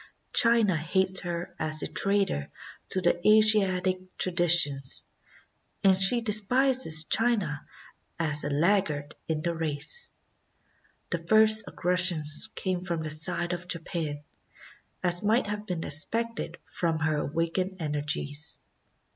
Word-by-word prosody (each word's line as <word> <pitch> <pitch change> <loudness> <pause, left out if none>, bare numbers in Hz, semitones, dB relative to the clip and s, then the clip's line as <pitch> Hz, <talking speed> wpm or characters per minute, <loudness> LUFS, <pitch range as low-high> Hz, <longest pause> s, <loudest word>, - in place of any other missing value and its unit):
China 230 -5 +4
hates 185 +4 0
her 175 -1 -6
as 155 -1 +1
a - - -3
traitor 195 - -1 0.4
to 175 -2 0
Asiatic 195 -4 +3 0.2
tra 185 - +1
ditions, 165 -6 +3 0.8
and 195 -1 +4
she 195 +6 +3
despises 225 - +4
China 205 -8 0 0.5
as 150 -3 0
a 145 - -3
laggard 155 -2 -1
in 155 -1 -3
the 170 - -2
race. 160 - -1 1.0
The 170 - -2
first 215 +4 +3
aggressions 180 0 +2
came 185 -2 -3
from 170 -3 -5
the 155 - -3
side 170 +3 -1
of 175 0 -7
Japan, 160 -4 -4 0.8
as 175 -1 +1
might 220 +4 0
have 210 0 -6
been 175 -3 -4
expected 230 +10 0
from 165 -2 -3
her 155 0 -2
awakened 165 +5 -3
energies. 145 0 -4
175 Hz, 120 wpm, -26 LUFS, 155-200 Hz, 1.0 s, China